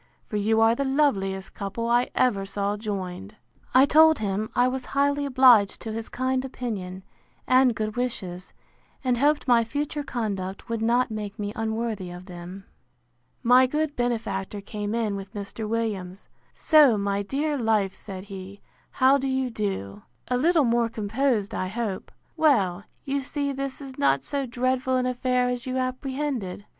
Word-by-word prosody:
for 215 - -7
you 215 +2 +2
are 225 0 +5
the 275 - -1
loveliest 205 -10 0
couple 205 +4 -4
I 240 +1 +2
ever 210 -6 +2
saw 200 +1 -2
joined. 200 -1 -5 0.4
I 260 +1 +8
told 315 +1 +6
him, 210 +1 -2
I 245 - +4
was 255 0 -2
highly 285 0 +2
obliged 250 -6 +5
to 225 - -5
his 225 0 -5
kind 260 0 -1
opinion, 200 -8 -5 0.4
and 255 -2 +4
good 215 -1 -3
wishes; 185 -8 -4 0.5
and 250 -2 +1
hoped 290 +1 +2
my 240 -2 +5
future 290 +5 -3
conduct 200 -8 -4
would 230 -1 -2
not 240 +2 +2
make 210 -1 -5
me 205 -1 -4
unworthy 220 -3 -2
of 175 +1 -9
them. 180 +1 -9 0.8
My 250 +2 +6
good 300 +2 -1
benefactor 220 -5 -2
came 205 +1 -4
in 220 -3 0
with 195 +2 -8
Mr. 205 +2 -5
Williams: 205 -5 -3 0.3
So, 295 -8 +5
my 200 0 -1
dear 290 +8 -1
life, 220 -6 +1
said 190 -2 -8
he, 195 0 -9 0.3
how 265 +2 +4
do 270 - -2
you 265 -1 -1
do? 150 - -4 0.3
A 250 - +1
little 315 +3 +3
more 235 0 +2
composed, 220 0 -1
I 185 - -2
hope. 210 -1 -4 0.2
Well, 205 - +2 0.2
you 275 0 -1
see 280 +1 -2
this 275 0 -4
is 270 -2 -10
not 135 0 +2
so 280 -2 -2
dreadful 255 +1 0
an 250 - 0
affair 250 0 +1
as 250 +1 -3
you 255 0 -2
apprehended. 255 -6 -3
230 Hz, 165 wpm, -25 LUFS, 200-260 Hz, 0.8 s, I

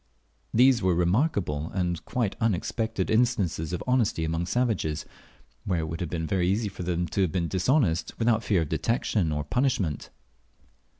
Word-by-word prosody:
These 125 +1 +5
were 90 -2 +2
remarkable 90 - +1
and 90 -3 -1
quite 115 -6 -1
unexpected 110 0 -1
instances 110 -9 +1
of 90 - -3
honesty 120 -10 +1
among 80 +2 -2
savages, 90 -10 0 0.6
where 90 -4 0
it 80 - -4
would 80 +1 -5
have 85 - -2
been 80 -2 -2
very 90 +1 0
easy 105 +2 0
for 95 - -9
them 90 0 -1
to 100 - 0
have 90 -4 +1
been 90 -2 -1
dishonest 95 - +1
without 115 -1 +2
fear 95 -6 +2
of 75 - -7
detection 95 -1 0
or 75 -1 -1
punishment. 110 - -1
95 Hz, 165 wpm, -27 LUFS, 80-115 Hz, 0.6 s, These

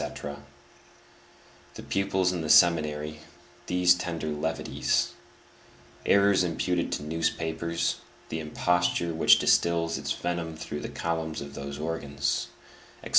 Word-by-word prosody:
_; 70 0 -6 1.4
the - - -8
pupils 95 -1 +1
in 90 -2 -3
the 80 - -4
seminary, 75 -2 +4 0.5
these 90 0 +5
tender 85 -3 -4
levities; 75 +2 -1 1.0
errors 100 -1 +5
imputed 90 0 -1
to - - -2
newspapers, 80 +1 -1 0.3
the 80 - -3
imposture 85 +2 0
which 80 - +6
distills 85 -1 +2
its - - -4
venom 85 -2 -3
through 80 -2 -5
the - - -6
columns 80 -1 -3
of 70 0 -8
those 70 0 -6
organs; 70 -2 -2 0.6
etc. - - -7
80 Hz, 120 wpm, -27 LUFS, 75-85 Hz, 1.4 s, which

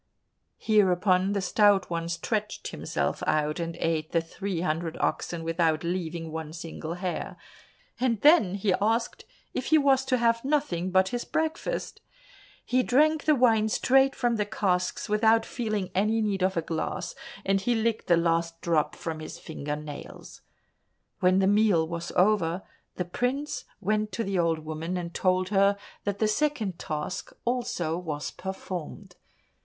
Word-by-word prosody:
Hereupon 190 -2 +3
the 200 - 0
Stout 200 0 +3
One 170 0 -2
stretched 210 +5 -2
himself - - -2
out 150 +1 +1
and 165 0 -3
ate 160 -2 -1
the 170 - +4
three 170 +2 -4
hundred 165 -1 -2
oxen 170 -1 -1
without 165 -1 +1
leaving 170 -2 -3
one 160 -1 -5
single 165 0 -6
hair, 180 0 -4 0.6
and 240 -4 +1
then 285 - +6
he 200 -1 +1
asked 225 +3 0 0.3
if - - -3
he 315 - +5
was 275 -3 +4
to 260 -1 +2
have 230 -1 +2
nothing 265 - 0
but 190 +1 +3
his 245 +2 -3
breakfast. 320 +10 -2 0.6
He 255 +1 +2
drank 300 +5 +3
the 305 - +5
wine 225 -4 +3
straight 270 +4 +3
from 240 -2 +1
the 210 - 0
casks 185 -4 -1
without 220 +1 +3
feeling 215 -6 -3
any 215 +4 +2
need 205 -3 0
of 185 -1 +1
a 165 - +1
glass, 160 -1 -3 0.3
and 195 0 +2
he 240 +4 +1
licked 225 0 -1
the 170 - +5
last 165 0 0
drop 165 -3 +1
from 160 -2 -5
his 155 - -7
finger 150 -2 -5
nails. 150 -1 -9 0.8
When 185 +1 +4
the 190 - +3
meal 200 -5 +3
was 170 +1 -5
over, 180 -2 +2 0.3
the 180 - -2
prince 255 +10 -2
went 215 +1 0
to 230 - -1
the 195 -3 -1
old 165 -2 0
woman, 160 +3 -3
and 170 -1 -5
told 185 0 +1
her 200 0 +3 0.3
that 205 -1 -1
the 215 - +2
second 220 - 0
task 155 +4 -4
also 180 -9 -1
was 150 -4 -4
performed. 190 -3 -7
190 Hz, 160 wpm, -27 LUFS, 170-220 Hz, 0.8 s, then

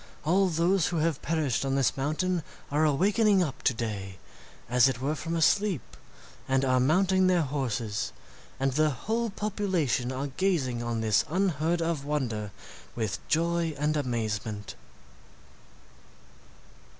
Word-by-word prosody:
All 185 +4 +3
those 170 +2 +2
who 175 - -2
have 160 -3 0
perished 150 -6 0
on 135 0 0
this 135 -2 +2
mountain 160 +6 0 0.3
are 150 +2 +2
awakening 195 +6 +3
up 145 -6 -5
to - - +3
day, 100 -5 -4 0.5
as 125 +1 +5
it 130 -3 -1
were 140 +4 -1
from 165 +2 -4
a 165 - +2
sleep, 185 - +1 0.5
and 135 0 +2
are 130 -1 +3
mounting 185 +7 +3
their 180 -3 +3
horses, 120 -7 -2 0.5
and 135 0 +1
the 155 +3 +2
whole 225 - -2
population 190 - -1
are 130 +2 -3
gazing 140 -6 0
on 120 -1 -2
this 110 -5 +3
unheard 170 -2 0
of 165 -4 -1
wonder 125 -8 -2 0.5
with 110 -4 -2
joy 170 0 +1
and 150 +2 0
amazement." 110 -6 -3
150 Hz, 140 wpm, -28 LUFS, 125-175 Hz, 0.5 s, as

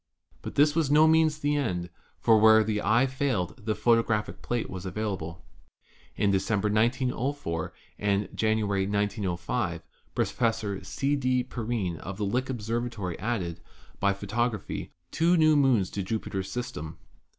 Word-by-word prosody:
But - - -7
this 145 +1 +5
was 160 -4 +2
by 145 - +4
no 155 +1 +7
means 160 -1 +4
the 145 -1 0
end, 90 - -2 0.3
for 110 -2 +4
where 110 0 +7
the 105 -1 -1
eye 115 +5 +3
failed 125 -11 -2
the 110 -1 0
photographic 110 0 +1
plate 120 -1 -2
was 95 -1 -7
available. 95 -4 -4 0.7
In 100 - +2
Decem 100 +2 +1
ber, 105 +1 0
1904, 120 - 0 0.3
and 100 0 +1
January, 105 -3 +1
1905, 100 -4 -1 0.3
Professor 110 -4 -1
C. 140 +1 -1
D. 130 -2 +1
Perrine 110 -8 -3
of 95 +2 -7
Lick 120 +6 -1
Observatory 115 -5 -3
added, 95 -6 -2 0.4
by 100 - +3
photography, 105 +2 -2 0.2
two 170 +2 +3
new 155 -1 +5
moons 130 -10 +3
to 100 - -3
Jupiter's 95 -1 -3
system. 85 -11 -5
110 Hz, 140 wpm, -28 LUFS, 100-125 Hz, 0.7 s, no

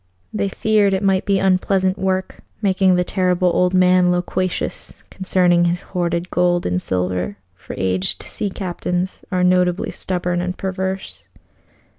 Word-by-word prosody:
They 200 -2 -1
feared 205 -1 +2
it 190 - -2
might 190 -1 +2
be 200 -1 +2
unpleasant 190 0 +2
work 190 0 -1 0.2
making 190 -2 +3
the 180 - +2
Terrible 180 -1 +1
Old 180 +1 +2
Man 180 -1 +4
loquacious 180 +1 -3
concerning 180 -2 +2
his 175 +1 -1
hoarded 175 -1 -1
gold 175 0 +1
and 90 +1 0
silver, 90 +2 -2 0.2
for 90 - -10
aged 95 0 -1
sea 205 - -4
captains 180 -1 -3
are 180 -1 +1
notably 180 0 +2
stubborn 180 -1 -2
and 180 +1 -3
perverse. 190 0 -4
180 Hz, 140 wpm, -20 LUFS, 175-190 Hz, 0.2 s, Man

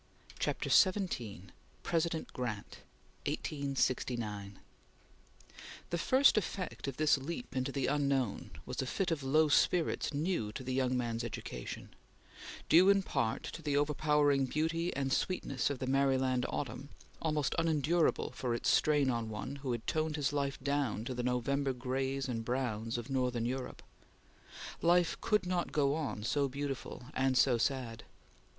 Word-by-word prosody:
CHAPTER - - -1
XVII 125 - +2 0.3
PRESIDENT 165 -1 -1
GRANT 115 -5 -4 0.5
(1869) 120 -8 -2 1.3
THE 170 - +1
first 260 +3 +5
effect 185 -6 -5
of 135 - -4
this 155 -2 +4
leap 170 - -6
into 130 +1 -1
the 135 -1 -1
unknown 140 -6 0 0.2
was - - -3
a 130 - -3
fit 180 +5 -1
of 160 -3 -1
low 155 +4 +3
spirits 165 +3 +2
new 150 - -1
to 130 - -6
the 130 0 -3
young 130 -1 +1
man's 115 -1 -2
education; 115 - -6 0.8
due 180 +4 +7
in 200 -1 +5
part 115 -8 -1
to 165 - -7
the 145 -2 0
overpowering 145 -2 +2
beauty 165 +5 0
and 135 -1 0
sweetness 140 -9 0
of 140 - -2
the 130 - -3
Maryland 130 -1 +2
autumn, 130 +1 -4 0.3
almost 150 -4 0
unendurable 165 0 +2
for 125 -3 -2
its 120 - 0
strain 145 -3 +3
on 115 -2 -2
one 130 +6 -5
who 135 -2 -3
had 120 -1 -3
toned 155 -1 0
his 145 -2 0
life 140 -1 -1
down 140 -6 0
to 130 - -3
the 125 - -2
November 130 +3 0
grays 130 +2 -2
and 115 -3 -2
browns 115 -2 -2
of 120 +3 -6
northern 125 -3 0
Europe. 130 +1 -4 1.0
Life 175 0 +3
could 210 -4 +2
not 180 -1 -1
go 140 -2 +2
on 145 -9 -3
so 140 +4 +1
beautiful 140 -2 -5
and 130 0 +2
so 125 -2 +4
sad. 120 -3 -1
135 Hz, 150 wpm, -33 LUFS, 125-155 Hz, 1.3 s, due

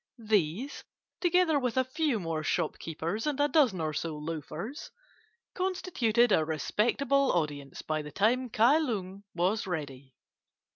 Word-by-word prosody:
These, 215 - -1 0.4
together 350 -4 +3
with 250 -2 -2
a 260 - +5
few 260 -2 0
more 165 -3 -2
shopkeepers 165 - -2
and 290 -2 -1
a 290 - +4
dozen 270 - +3
or 155 -1 -1
so 155 0 -3
loafers, 165 - -6 0.6
constituted 255 - +1
a 160 - +4
respectable 240 - +1
audience 145 -5 -3
by 155 0 -1
the 150 0 -9
time 245 - +1
Kai 235 +8 +4
Lung 200 - -3
was 185 +5 0
ready. 140 -6 -5
210 Hz, 135 wpm, -29 LUFS, 160-265 Hz, 0.6 s, a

